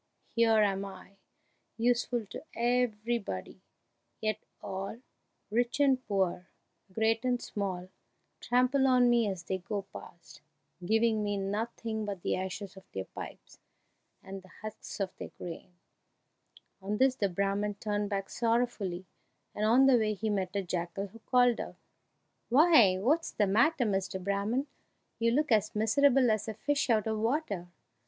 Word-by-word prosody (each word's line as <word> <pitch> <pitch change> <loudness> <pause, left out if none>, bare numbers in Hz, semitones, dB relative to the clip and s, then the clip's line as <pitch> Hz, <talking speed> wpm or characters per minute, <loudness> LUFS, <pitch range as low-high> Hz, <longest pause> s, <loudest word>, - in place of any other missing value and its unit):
Here 225 -2 +4
am 195 -1 0
I, 195 0 -11 0.6
useful 240 0 +1
to - - -7
everybody, 235 - -1 0.6
yet 215 -2 -1 0.2
all, 195 +3 -5 0.5
rich 240 +4 0
and 270 -3 +3
poor, 185 -3 0 0.4
great 225 +4 +1
and 250 -1 +1
small, 185 -5 -4 0.5
trample 255 +3 +2
on 250 -2 +5
me 235 -3 +3
as 185 -3 -5
they 190 +1 -2
go 200 +2 -4
past, 170 -1 -12 0.4
giving 220 +2 +2
me 205 -1 -1
nothing 220 +2 -3
but 200 -4 -5
the - - +1
ashes 190 +1 -5
of 190 - -15
their 95 0 -3
pipes - - -10 0.6
and 195 0 -8
the 190 - -17 0.2
husks 215 0 -7
of 195 -2 -2
their - - -7
grain!" 175 +1 -8 1.1
On 205 +2 -2
this 260 +2 +4
the 205 -6 0
Brahman 200 +2 -1
turned 205 0 -2
back 195 -1 -2
sorrowfully, 230 -6 -1 0.5
and 210 - -1
on 245 +5 +6
the 260 -3 +6
way 215 -1 0
he 215 +2 -2
met 190 -2 -2
a 200 - 0
jackal, 180 +2 -3
who 230 +4 -14
called 245 0 +3
out, - - -6 0.7
"Why, 250 - +6
what's 295 - +1
the 210 - +1
matter, 240 +7 +3
Mr. 195 -2 -1
Brahman? 200 +7 -1 0.5
You 230 0 +3
look 295 +4 +1
as 215 -1 +2
miserable 250 +3 +4
as 215 0 -1
a 220 - -4
fish 280 +4 0
out 220 -3 +3
of 220 -1 -1
water!" 225 - -1
215 Hz, 150 wpm, -30 LUFS, 195-240 Hz, 1.1 s, on